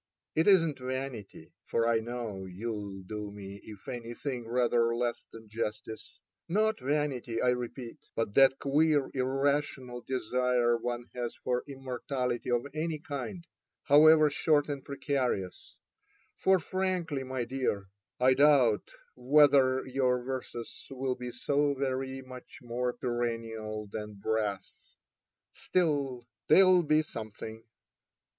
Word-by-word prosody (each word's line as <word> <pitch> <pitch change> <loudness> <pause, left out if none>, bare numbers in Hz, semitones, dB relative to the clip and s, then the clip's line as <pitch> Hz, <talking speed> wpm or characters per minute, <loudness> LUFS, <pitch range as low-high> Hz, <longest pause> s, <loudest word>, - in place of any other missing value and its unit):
It 160 - +2
isn't 165 -8 +5
vanity 130 -4 -6
(for 115 0 +1
I 115 -1 +3
know 115 -4 -5
you'll 100 0 -5
do 105 +2 -5
me, 100 -1 -9
if 105 -3 -12
anything, 120 +1 -5
rather 120 -1 +2
less 120 0 -2
than 115 -1 -12
justice 110 0 -5
!), - - -56
not 220 0 +2
vanity, 135 -4 -1
I 125 - +3
repeat; 125 +2 -4 0.2
but 115 -3 -1
that 135 +1 +6
queer 145 0 +2
irrational 135 -1 -1
desire 125 -1 +1
one 120 +1 -3
has 120 -1 -4
for 125 0 -2
im 135 -1 -10
mortality 125 -1 -2
of 120 +1 +1
any 155 +1 -2
kind, 150 +4 -6 0.4
however 155 +1 +7
short 150 0 +2
and 140 -2 -4
precarious 130 -9 -2 0.3
— - - -38
for 190 0 +6
frankly, 180 -5 -2
my 130 -1 -3
dear, 120 -6 -2 0.3
I 130 +1 +5
doubt 135 -6 +4 0.3
whether 130 0 +4
your 130 -1 +1
verses 125 -2 -6
will 135 -1 -2
be 125 -1 -6
so 140 +4 0
very 135 0 -2
much 130 -1 -11
more 125 +1 -1
perennial 115 -3 -3
than 105 -1 -6
brass. 100 -1 -3 0.6
Still, 140 -8 0 0.2
they'll 185 -1 +7
be 155 -1 +3
something. 110 -3 -8
125 Hz, 125 wpm, -30 LUFS, 115-140 Hz, 0.6 s, however